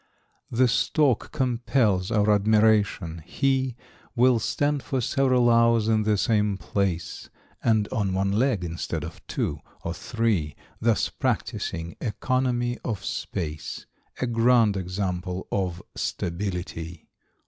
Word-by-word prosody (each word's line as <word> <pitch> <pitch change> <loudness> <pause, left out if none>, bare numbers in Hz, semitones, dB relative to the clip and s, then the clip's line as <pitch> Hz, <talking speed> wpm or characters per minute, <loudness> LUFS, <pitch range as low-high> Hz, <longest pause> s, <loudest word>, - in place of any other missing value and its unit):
= - - -41
The 130 - +6
Stork 135 0 +2
compels 120 -6 +1
our 105 -2 +3
admiration, 105 -5 +3
he 130 - 0 0.4
Will 125 -1 +4
stand 145 +5 0
for 130 - -2
several 125 0 +2
hours 115 -1 +4
in 110 -1 +3
the 105 -1 +2
same 105 -2 +1
place 95 -4 -2 0.3
And 110 -3 +3
on 105 -6 -1
one 95 +1 0
leg, 110 -2 +1
instead 85 -2 -3
of 80 +2 -8
two - - -2 0.2
(or 85 - -2
three), 100 -6 -1 0.2
Thus 115 -1 +2
practising 85 +1 -3
economy 120 +1 0
of 105 -5 -3
space. 75 -3 -4 0.3
A - - 0
grand 115 -2 +4
example 90 -1 -3
of 90 -2 -2
stability! 85 -2 -4
105 Hz, 120 wpm, -25 LUFS, 90-120 Hz, 0.4 s, The